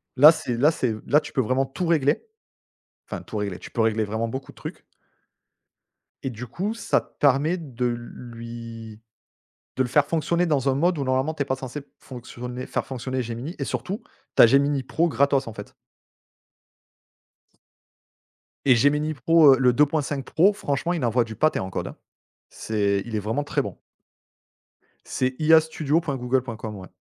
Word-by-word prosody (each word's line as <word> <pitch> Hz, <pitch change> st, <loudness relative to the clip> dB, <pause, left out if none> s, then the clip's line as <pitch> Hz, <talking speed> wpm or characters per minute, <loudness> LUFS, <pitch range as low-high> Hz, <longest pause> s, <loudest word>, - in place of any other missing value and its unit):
là, 145 Hz, +4 st, +9 dB
c'est 125 Hz, -7 st, -3 dB
là, 145 Hz, +6 st, +4 dB
c'est 125 Hz, -8 st, -1 dB
là, 150 Hz, -, +4 dB
tu -, -, -10 dB
peux 135 Hz, -, +2 dB
vraiment 130 Hz, +3 st, +1 dB
tout 135 Hz, +7 st, -4 dB
régler. 155 Hz, -, +2 dB, 0.9 s
Enfin, -, -, -5 dB
tout 110 Hz, -, -7 dB
régler, 100 Hz, -3 st, -3 dB
tu -, -, -11 dB
peux 115 Hz, -, 0 dB
régler 110 Hz, 0 st, +2 dB
vraiment 110 Hz, +2 st, -2 dB
beaucoup 130 Hz, +4 st, -6 dB
de -, -, -25 dB
trucs -, -, -8 dB, 1.4 s
et 135 Hz, -, -1 dB
du 125 Hz, +1 st, -7 dB
coup, 195 Hz, -, -3 dB
ça 230 Hz, -, 0 dB
te -, -, -26 dB
permet 145 Hz, +5 st, +3 dB
de 130 Hz, -7 st, -4 dB
l 120 Hz, -1 st, +1 dB
lui, 115 Hz, -2 st, -9 dB, 0.8 s
de 130 Hz, -, +3 dB
le 125 Hz, -, -4 dB
faire 145 Hz, +3 st, +4 dB
fonctionner 170 Hz, +3 st, 0 dB
dans 145 Hz, -5 st, +1 dB
un 130 Hz, -, +1 dB
mode 175 Hz, +4 st, +2 dB
où 140 Hz, -, -1 dB
normalement 130 Hz, +4 st, 0 dB
tu 145 Hz, -, -1 dB
es -, -, -12 dB
pas 130 Hz, -, -1 dB
censé 135 Hz, +2 st, -7 dB, 0.2 s
fonctionner 125 Hz, 0 st, -8 dB
faire -, -, -2 dB
fonctionner 130 Hz, 0 st, -3 dB
Gemini, 120 Hz, +8 st, -5 dB
et -, -, -1 dB
surtout, 200 Hz, +6 st, -4 dB, 0.3 s
tu -, -, +8 dB
as -, -, +9 dB
Gemini 140 Hz, +2 st, +3 dB
Pro 165 Hz, +6 st, +1 dB
gratos, 140 Hz, -4 st, +2 dB
en 115 Hz, -, -6 dB
fait 105 Hz, -1 st, -10 dB, 2.9 s
et 130 Hz, -3 st, +6 dB
Gemini 150 Hz, +5 st, +2 dB
pro, 155 Hz, +1 st, +6 dB
heu, -, -, -4 dB
le 125 Hz, -2 st, +4 dB
2.5 145 Hz, 0 st, +1 dB
Pro, 185 Hz, +9 st, +3 dB
franchement, 170 Hz, -2 st, -2 dB
il 170 Hz, -, -2 dB
envoie 120 Hz, +1 st, +2 dB
du 110 Hz, -1 st, -8 dB
pâté 155 Hz, +8 st, +2 dB
en 95 Hz, -, -4 dB
code, -, -, -4 dB
hein. -, -, -9 dB, 0.5 s
C'est, 100 Hz, -2 st, -1 dB
il 120 Hz, -, -8 dB
est -, -, +1 dB
vraiment 110 Hz, +8 st, -2 dB
très 145 Hz, -, 0 dB
bon. -, -, -7 dB, 1.3 s
C'est 130 Hz, 0 st, -1 dB
iastudio.google.com, 140 Hz, -7 st, +1 dB
ouais 95 Hz, -2 st, -9 dB
130 Hz, 175 wpm, -24 LUFS, 120-150 Hz, 2.9 s, là